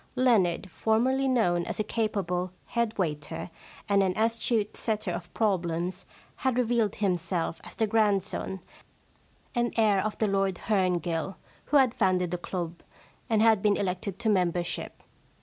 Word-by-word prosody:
Leonard, 205 -9 +3
for 220 +5 +1
merly 265 +2 +2
known 180 -9 +2
as - - -5
a - - +2
capable 195 -5 -1
head 235 -2 -1
waiter 155 -1 -3 0.4
and 200 -1 +4
an 185 -2 0
astute 225 -1 +1
setter 215 -4 -1
of 175 0 -6
problems, 180 -3 -1 0.3
had 260 -3 0
revealed 235 -4 +1
himself 175 -4 -1
as - - -11
the 220 - +2
grandson 205 -3 0 0.9
and 240 -1 +1
heir 210 -4 +4
of 215 0 -3
the 220 - +1
Lord 195 -1 +1
Herngill 180 -3 0 0.3
who 295 - +3
had 260 -4 +4
founded 185 -5 +1
the 180 - -2
club, 175 -2 -5 0.5
and 220 -1 +3
had 220 -3 +5
been 205 -1 +3
elected 190 0 -2
to 235 -2 0
membership. 180 -3 -1
200 Hz, 150 wpm, -28 LUFS, 180-225 Hz, 0.9 s, had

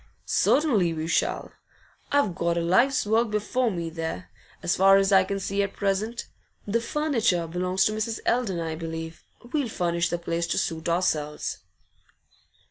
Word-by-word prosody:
'Certainly 215 - +2
we 160 0 -3
shall. - - 0 0.6
I've 285 -10 +2
got 170 +1 -1
a - - +1
life's 240 +12 +3
work 225 +2 +2
before 215 +4 0
me 170 -5 -3
there, 165 +2 -5 0.3
as 175 - +1
far 195 +1 +6
as 195 0 +2
I 190 -1 +6
can 195 +1 -3
see 200 +1 -1
at 200 0 -2
present. 205 +4 -1 0.4
The 230 +3 0
furniture 230 - 0
belongs 180 +3 0
to - - +2
Mrs. 220 +1 -2
Eldon, 225 -8 +1
I 165 -1 -3
believe; 160 0 -6 0.3
we'll 285 -6 0
furnish 170 -4 0
the 175 - -1
place 170 0 -2
to - - -1
suit 160 +1 -2
ourselves. 155 -4 -1
190 Hz, 160 wpm, -26 LUFS, 170-220 Hz, 0.6 s, far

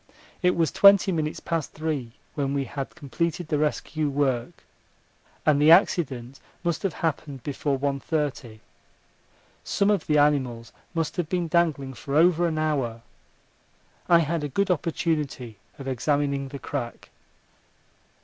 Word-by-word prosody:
It 180 0 +3
was 165 -3 +1
twenty 200 -1 +6
minutes 155 -3 -2
past 165 -3 -3
three 150 -7 -3 0.2
when 140 -2 -1
we 140 - 0
had 135 +1 -6
completed 170 +2 -3
the 150 - +1
rescue 155 0 -1
work, 135 -4 -1 0.8
and 145 -2 +4
the 150 - +6
accident 135 - +3 0.2
must 170 -3 -1
have 195 -5 -1
happened 145 -4 -3
before 140 -1 -1
one 140 0 -1
thirty. 135 -8 -3 1.0
Some 200 +1 +1
of 200 -5 0
the 150 - +3
animals 130 -6 +1 0.2
must 165 +2 -2
have 170 -3 -1
been 175 -2 -1
dangling 155 -5 +1
for 140 +2 -5
over 170 +2 +4
an 160 -2 -2
hour. 135 -7 -1 1.1
I 170 -1 +7
had 165 0 -1
a 145 - -2
good 195 +7 +1
opportunity 150 - -2 0.2
of 135 - -8
examining 140 +1 0
the 140 +1 -7
crack. 120 -2 -6
150 Hz, 140 wpm, -25 LUFS, 135-165 Hz, 1.1 s, I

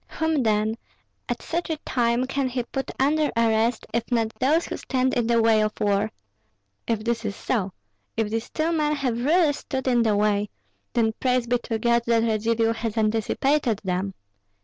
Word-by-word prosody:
Whom, 320 -3 +1
then, 220 0 +1 0.5
at - - -3
such 340 +1 -3
a 320 - -1
time 240 0 +1
can 270 0 -1
he 250 -1 -2
put 270 +3 -4
under 295 +3 +2
arrest, 225 0 +2
if 235 +2 -2
not 225 -2 +1
those 305 +6 +2
who - - -5
stand 260 -1 0
in 240 -2 +1
the 235 -1 +3
way 225 -1 +4
of 215 0 0
war? 205 +1 +1 0.8
If 220 -2 -1
this 235 0 -1
is 205 -2 -3
so, 200 -7 -1 0.5
if 220 -2 0
these 225 +1 -2
two 320 +1 -1
men 300 -2 +1
have 250 -4 -1
really 315 +1 +4
stood 265 -1 -4
in 245 -2 +3
the 220 -2 +2
way, 205 0 +1 0.4
then 225 -2 +2
praise 250 -2 +1
be 245 +1 +1
to 225 - -1
God 235 +1 +2
that 230 -1 +3
Radzivill 225 0 +1
has 225 0 -3
anticipated 225 +3 +1
them. 190 +1 -2
235 Hz, 185 wpm, -24 LUFS, 220-260 Hz, 0.8 s, way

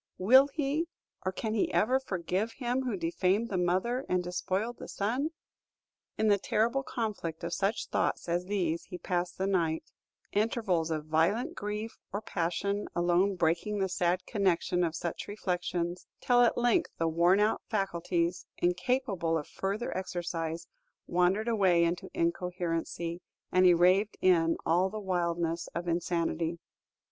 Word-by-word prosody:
Will 260 +9 +7
he 295 +3 -1 0.4
or 185 - 0
can 215 +3 -3
he 220 - +1
ever 255 +5 +3
forgive 195 -1 -2
him 250 +1 -1
who 245 -6 -2
defamed 185 +6 +1
the 190 - -1
mother 190 +9 +1
and 180 0 +1
despoiled 190 +6 -2
the - - -7
son?" 245 +9 -1 0.9
In 220 - +2
the 205 -1 +4
terrible 230 +7 +1
conflict 210 -11 -4
of 170 0 -3
such 205 +2 0
thoughts - - -1
as 175 +1 0
these 180 -4 -1
he 180 - -7
passed 180 -1 -2
the 190 - 0
night; 170 -5 0 0.4
intervals 205 -6 +1
of 155 -2 -2
violent 190 - +1
grief 210 -3 -5
or 200 - -2
passion 200 +1 -2
alone 175 +3 +2
breaking 175 +5 0
the 195 -1 +1
sad 180 0 0
connection 180 -4 +1
of 165 -1 -1
such 170 -1 -4
reflections, 180 -3 -2
till 245 -1 +4
at 240 - +4
length 240 -1 +2
the 165 - +1
worn 170 +4 +4
out 210 +1 +2
faculties, 175 -4 -1
incapable 180 -2 0
of 150 - -5
further 200 +5 -3
exercise, 170 -3 -3 0.4
wandered 180 +5 +2
away 190 -7 +4
into 170 +1 -1
incoherency, 170 0 -2 0.3
and 185 0 +5
he 180 - +7
raved 185 +5 +3
in 165 -3 +3
all 175 +4 +3
the 215 +2 -5
wildness 170 -3 -1
of 170 +1 -3
insanity. 170 -1 -1
185 Hz, 150 wpm, -30 LUFS, 170-215 Hz, 0.9 s, Will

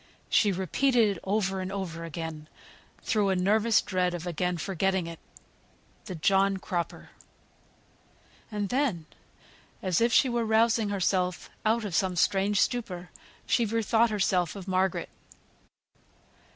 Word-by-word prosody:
She 205 - +4
repeated 205 - +2
it - - -15
over 195 -1 0
and 185 +1 -4
over 180 -4 -5
again, 160 -1 -6 0.5
through 210 -4 +1
a 190 - +2
nervous 210 +4 +3
dread 180 -2 0
of 175 0 -6
again 180 +1 -1
forgetting 190 +1 -1
it. 165 -1 -8 0.9
The 185 - -6
John 195 +4 +2
Cropper. 175 -3 -4 1.4
And 205 -2 -2
then, 245 - 0 0.8
as 185 +1 +1
if 235 +1 +3
she 265 - +5
were 240 -1 0
rousing 225 0 +2
herself 185 -2 -1 0.2
out 225 0 +1
of 195 - -5
some 185 +1 +1
strange 195 +3 +2
stupor, 185 -7 -1 0.3
she 240 - +2
bethought 225 +1 +2
her 210 -1 -3 0.4
of 195 -1 -8
Margaret. 185 0 0
195 Hz, 130 wpm, -28 LUFS, 180-220 Hz, 1.4 s, she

